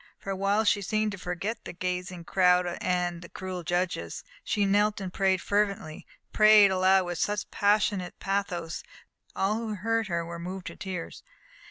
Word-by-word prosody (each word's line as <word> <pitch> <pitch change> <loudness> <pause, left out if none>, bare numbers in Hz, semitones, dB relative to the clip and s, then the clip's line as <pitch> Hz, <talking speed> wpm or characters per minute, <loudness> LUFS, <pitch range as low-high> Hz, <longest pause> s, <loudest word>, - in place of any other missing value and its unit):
For 195 - -6
a - - -1
while 200 +3 +2
she 205 -1 +2
seemed 215 +2 0
to 190 - -7
forget 190 +6 -4
the - - -7
gazing 180 0 -4
crowd 180 0 +3 0.2
and 175 -1 -1
the 170 - -11
cruel 185 -1 -5
judges. 175 - -2 0.2
She 205 - +1
knelt 205 +1 +2
and 185 -2 -5
prayed 190 -2 +2
fervently 200 -6 -1 0.3
prayed 215 -2 +7
aloud 190 0 +4
with 175 -1 -4
such 205 0 -1
passionate 205 -3 +1
pathos, 180 -4 -2
that - - -26 0.5
all 200 +3 +2
who 220 -2 -3
heard 225 +2 0
her 170 -2 -1
were 170 0 -7
moved 180 +2 -6
to - - -7
tears. 185 -3 -6
190 Hz, 175 wpm, -28 LUFS, 180-205 Hz, 0.5 s, prayed